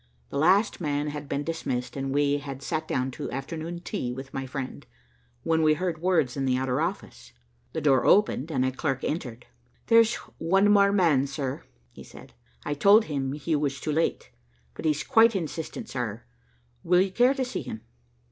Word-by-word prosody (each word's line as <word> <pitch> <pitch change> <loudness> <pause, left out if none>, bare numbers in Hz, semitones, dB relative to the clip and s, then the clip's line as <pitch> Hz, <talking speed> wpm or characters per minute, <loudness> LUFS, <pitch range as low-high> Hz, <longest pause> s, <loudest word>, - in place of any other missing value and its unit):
The - - -3
last 190 +6 +3
man 145 -1 -1
had 145 -1 -7
been 140 +1 -1
dismissed 135 -6 -3
and 135 -1 -3
we 145 +1 +2
had 135 -1 -8
sat 155 +2 -3
down 130 -2 -1
to - - -6
afternoon 160 +6 -5
tea 175 - -3
with 135 +2 -8
my 135 0 -4
friend, 130 0 -6 0.6
when 160 0 +2
we 155 -1 +4
heard 170 -2 -3
words 165 -9 +1
in 135 -1 -1
the 130 -1 +2
outer 130 +2 -1
office. 175 +5 -5 0.4
The 160 - -2
door 135 -4 +3
opened 175 -7 +3
and 130 -3 +1
a 130 - 0
clerk 135 0 -2
entered. 125 -7 -4 0.4
"There's 230 -1 +5 0.2
one 195 +5 +3
man 200 0 +4
more, 150 -7 +3
sir," 135 -1 -4 0.3
he - - -12
said, - - -14 0.3
"I - - -1
told 200 +9 +5
him 135 -3 -2
he 150 +2 -1
was 140 -2 -1
too 155 - -3
late, 160 +2 -1 0.4
but - - -8
he's 155 -1 +1
quite 230 0 +5
insistent, 170 +6 -4
sir. 120 - -4 0.6
Will 180 +1 +4
you 190 0 0
care 245 +7 +3
to 265 -2 -1
see 250 - -4
him?" 110 - -7
150 Hz, 185 wpm, -26 LUFS, 135-175 Hz, 0.6 s, There's